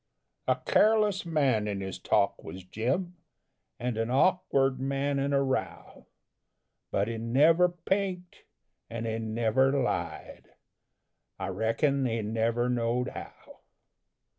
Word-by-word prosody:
A -, -, +4 dB
careless 215 Hz, -, +2 dB
man 135 Hz, -10 st, +1 dB
in 100 Hz, -2 st, -2 dB
his 95 Hz, -1 st, -5 dB
talk -, -, +1 dB
was 95 Hz, 0 st, -8 dB
Jim, 135 Hz, -, -2 dB, 0.6 s
And 120 Hz, -2 st, -2 dB
an 115 Hz, +1 st, -1 dB
awkward 135 Hz, -2 st, +2 dB
man 140 Hz, +1 st, -1 dB
in 140 Hz, +1 st, 0 dB
a 140 Hz, 0 st, +3 dB
row 130 Hz, -11 st, -4 dB, 0.8 s
But 100 Hz, +1 st, 0 dB
he 115 Hz, -1 st, -4 dB
never 155 Hz, +10 st, +4 dB
pinked, 180 Hz, +1 st, -3 dB, 0.4 s
and 115 Hz, 0 st, -5 dB
he 110 Hz, 0 st, -2 dB
never 115 Hz, +4 st, +1 dB
lied, 135 Hz, -3 st, -3 dB, 0.8 s
I 95 Hz, 0 st, -4 dB
reckon 120 Hz, -, +1 dB
he 115 Hz, -2 st, -2 dB
never 115 Hz, +3 st, 0 dB
knowed 125 Hz, 0 st, 0 dB
how. -, -, -11 dB
130 Hz, 120 wpm, -28 LUFS, 115-150 Hz, 0.8 s, A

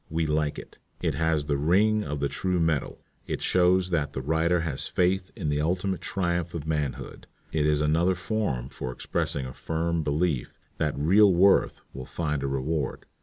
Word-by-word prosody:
We 80 Hz, +1 st, 0 dB
like 75 Hz, -1 st, 0 dB
it. -, -, -11 dB, 0.2 s
It -, -, 0 dB
has 80 Hz, -2 st, 0 dB
the 75 Hz, -1 st, 0 dB
ring 105 Hz, +8 st, +3 dB
of 75 Hz, -1 st, -4 dB
the 70 Hz, -, +2 dB
true 90 Hz, +6 st, -1 dB
metal. 80 Hz, -4 st, -1 dB, 0.2 s
It -, -, -2 dB
shows 90 Hz, 0 st, +3 dB
that 75 Hz, -5 st, 0 dB
the 65 Hz, -, -3 dB
writer 80 Hz, +4 st, +2 dB
has 80 Hz, -5 st, -3 dB
faith 90 Hz, +1 st, +1 dB
in 75 Hz, -, -3 dB
the 75 Hz, 0 st, 0 dB
ultimate 90 Hz, +3 st, -1 dB
triumph 85 Hz, -2 st, -2 dB
of 80 Hz, -3 st, -4 dB
manhood. 75 Hz, -4 st, -3 dB, 0.2 s
It 75 Hz, -1 st, +1 dB
is 75 Hz, -1 st, +2 dB
another 85 Hz, +5 st, +2 dB
form 85 Hz, -, -2 dB
for 65 Hz, -, -5 dB
expressing 65 Hz, +2 st, -2 dB
a 65 Hz, -, -7 dB
firm 80 Hz, +2 st, -1 dB
belief 75 Hz, -2 st, -1 dB, 0.2 s
that 75 Hz, -3 st, 0 dB
real 95 Hz, +8 st, +5 dB
worth 95 Hz, +3 st, +4 dB
will 65 Hz, -1 st, -7 dB
find 75 Hz, -4 st, -2 dB
a 70 Hz, -, -1 dB
reward. 70 Hz, +3 st, -2 dB
80 Hz, 180 wpm, -27 LUFS, 75-90 Hz, 0.2 s, real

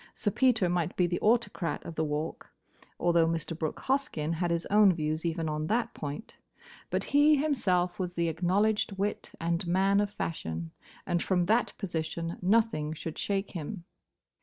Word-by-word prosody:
Sir 205 Hz, -, 0 dB
Peter 240 Hz, -5 st, +3 dB
might 175 Hz, -1 st, -1 dB
be 180 Hz, -, +4 dB
the 175 Hz, 0 st, -1 dB
autocrat 220 Hz, -6 st, +1 dB
of 165 Hz, -, -6 dB
the 160 Hz, -, -1 dB
Walk, 150 Hz, +1 st, -3 dB, 0.5 s
although 170 Hz, -1 st, +3 dB
Mr. 165 Hz, 0 st, -2 dB
Brooke 155 Hz, -1 st, -3 dB
Hoskyn 260 Hz, -, 0 dB
had 175 Hz, +1 st, -1 dB
his 170 Hz, 0 st, 0 dB
own 205 Hz, -1 st, +7 dB
views 155 Hz, 0 st, -2 dB
even 165 Hz, -1 st, -2 dB
on 155 Hz, 0 st, -2 dB
that 230 Hz, +3 st, 0 dB
point; 150 Hz, +10 st, -7 dB, 0.5 s
but -, -, -1 dB
he 290 Hz, +2 st, +5 dB
himself 195 Hz, -12 st, +1 dB
was 180 Hz, -1 st, -3 dB
the 170 Hz, 0 st, +1 dB
acknowledged 195 Hz, +6 st, +1 dB
wit 205 Hz, +2 st, -2 dB
and 170 Hz, +1 st, -1 dB
man 195 Hz, +3 st, +3 dB
of 205 Hz, -, 0 dB
fashion, 85 Hz, -, -4 dB, 0.3 s
and 175 Hz, -, 0 dB
from 180 Hz, -2 st, +1 dB
that 220 Hz, +7 st, +2 dB
position 165 Hz, -2 st, -3 dB
nothing 195 Hz, -6 st, +2 dB
should 160 Hz, 0 st, -6 dB
shake 200 Hz, -1 st, -1 dB
him. 170 Hz, +2 st, -6 dB
175 Hz, 165 wpm, -29 LUFS, 165-205 Hz, 0.5 s, own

